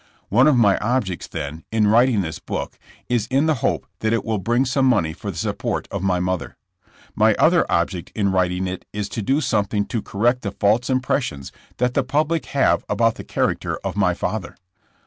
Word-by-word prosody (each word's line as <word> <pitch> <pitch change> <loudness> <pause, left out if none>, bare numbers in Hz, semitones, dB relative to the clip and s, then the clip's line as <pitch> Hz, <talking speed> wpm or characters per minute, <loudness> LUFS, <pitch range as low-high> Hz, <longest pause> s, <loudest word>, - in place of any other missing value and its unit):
One 125 +7 +5
of 145 -4 +4
my 105 -5 +4
objects, 105 -6 -1
then, 75 +3 -6
in 110 -1 +2
writing 115 +1 +4
this 80 -3 -5
book, - - -5 0.3
is 120 -3 0
in 135 +4 +2
the 160 - +3
hope - - 0
that 110 0 0
it 115 - -1
will 110 -2 -1
bring 120 +7 +1
some 130 +1 +2
money 85 -11 +2
for 100 +4 -7
the 90 - -6
support - - -2
of - - -3
my 95 -2 +1
mother. 90 0 -2 0.6
My - - +3
other - - +3
object - - -1
in 100 -2 +1
writing 90 0 +1
it 90 0 -4
is 105 -1 -3
to 115 - -4
do 135 +9 +1
something 105 -5 0
to 115 - -3
correct 120 +6 0
the 100 - -4
false 110 +5 +1
impressions 125 - -1 0.3
that 125 0 +1
the 140 - +2
public 150 +5 0
have 140 -1 +2
about 115 -1 +2
the - - -9
character - - -1
of 95 -2 -3
my 90 -4 +2
father. 100 -2 -4
110 Hz, 200 wpm, -22 LUFS, 95-125 Hz, 0.6 s, One